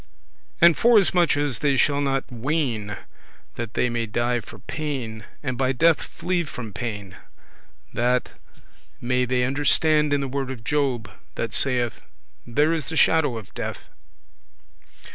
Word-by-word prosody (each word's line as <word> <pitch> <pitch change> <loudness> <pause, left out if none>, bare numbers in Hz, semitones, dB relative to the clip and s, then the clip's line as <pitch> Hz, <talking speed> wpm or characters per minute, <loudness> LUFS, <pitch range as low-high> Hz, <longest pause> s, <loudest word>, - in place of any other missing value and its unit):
And 170 -1 +8
forasmuch 185 -9 +4
as 145 -3 0
they 140 -2 +2
shall 145 +1 +3
not 135 -1 0
ween 120 - -2 0.6
that 115 -2 -6
they - - +2
may 120 -1 -2
die 120 +2 0
for 110 - -12
pain, 130 -8 -5 0.2
and 130 -3 -3
by 130 0 +2
death 165 +4 +4
flee 175 -1 -2
from 115 -9 -7
pain, 105 -6 -5 0.8
that 125 +1 +1 0.7
may 125 +1 +1
they 125 0 +1
understand 145 +3 +2
in 145 - +2
the 135 - -2
word 135 0 -3
of 125 -4 -7
Job, 130 -5 0 0.3
that - - -3
saith, 125 -3 +2 0.5
"There 150 +7 +2
is 160 -4 -2
the 160 - -3
shadow 150 -7 +3
of 110 - -10
death." - - -4
130 Hz, 145 wpm, -24 LUFS, 120-150 Hz, 0.8 s, And